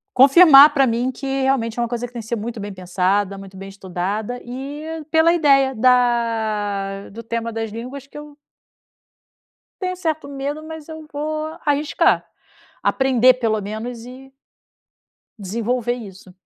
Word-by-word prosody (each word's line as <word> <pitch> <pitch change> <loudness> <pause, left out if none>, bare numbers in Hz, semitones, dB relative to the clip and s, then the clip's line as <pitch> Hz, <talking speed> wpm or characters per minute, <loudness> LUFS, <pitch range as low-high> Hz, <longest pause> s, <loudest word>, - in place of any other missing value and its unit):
confirmar 280 +2 +8
pra 270 -2 +4
mim 240 +2 0
que 275 - -8 0.2
realmente 240 -4 0
é - - +1
uma 235 - -1
coisa 240 +1 -3
que 245 - -18
tem 235 - -6
que 220 - -10
ser 235 - -1
muito 225 +2 -5
bem 205 0 -6
pensada, 190 +2 -1
muito 195 -1 -12
bem 195 +1 -8
estudada 195 +5 -4
e 295 +6 -7
pela 320 +1 +4
ideia 275 -5 +3
da 220 -5 0
do 230 +3 -9
tema 230 0 -4
das 225 -1 -4
línguas 255 +5 -8
que 295 - -11
eu 295 -1 -12 1.4
tenho 365 -1 -2
um - - -13
certo 315 -4 -3
medo, 285 +2 -5
mas 320 -1 -9
eu 315 -1 -9
vou 310 +2 -4
arriscar, 290 0 +2 0.6
aprender 255 -2 +4
pelo 225 -4 -1
menos 225 +3 -6
e 265 +2 -12 1.1
desenvolver 230 +4 -2
isso. 195 -5 -11
245 Hz, 155 wpm, -20 LUFS, 215-285 Hz, 1.4 s, confirmar